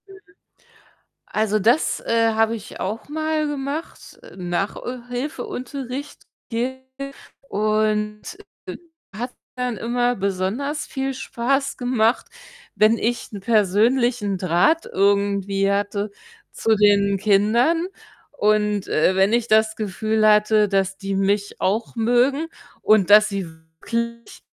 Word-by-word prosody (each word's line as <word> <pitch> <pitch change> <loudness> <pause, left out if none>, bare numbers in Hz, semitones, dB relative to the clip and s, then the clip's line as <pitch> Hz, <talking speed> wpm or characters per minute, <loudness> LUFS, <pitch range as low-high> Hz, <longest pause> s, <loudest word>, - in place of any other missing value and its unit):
Mhm. 390 0 -14 1.1
Also, 215 0 0
das, 235 +9 +2
äh, 230 0 +2
habe 225 +1 +2
ich 210 - -10
auch 210 +8 -4
mal 310 0 -1
gemacht, 290 +2 -5
äh, - - -14
Nach 180 +2 -2
äh, 250 0 -6
Hilfeunterricht 255 +1 -6 0.2
gegeben 260 +3 -4 0.4
und, 215 0 0 0.5
äh, - - -6 0.4
hat 245 +3 -4 0.2
dann 250 -2 -2
immer 245 +3 0
besonders 200 +10 -2
viel 270 0 -3
Spaß 270 +2 -1
gemacht, 245 -2 +1 0.5
wenn 215 +2 +4
ich 235 0 -2
'n 205 - -6
persönlichen 215 +1 +2
Draht 185 - +2
irgendwie 200 0 +1
hatte 205 +1 -1 0.4
zu 225 - +1
den 200 -1 +4
Kindern 225 - +2 0.4
und, 210 -5 +1
äh, 180 +4 +2
wenn 195 +2 +3
ich 235 0 +1
das 220 0 +3
Gefühl 215 +1 0
hatte, 210 0 +4
dass 195 -1 0
die 195 0 -4
mich 200 +1 0
auch 220 +5 -1
mögen 245 +7 +2 0.4
und 205 -3 +4
dass 215 +1 +8
sie 195 -3 -3 0.3
wirklich 235 0 -4
220 Hz, 120 wpm, -22 LUFS, 200-250 Hz, 1.1 s, dass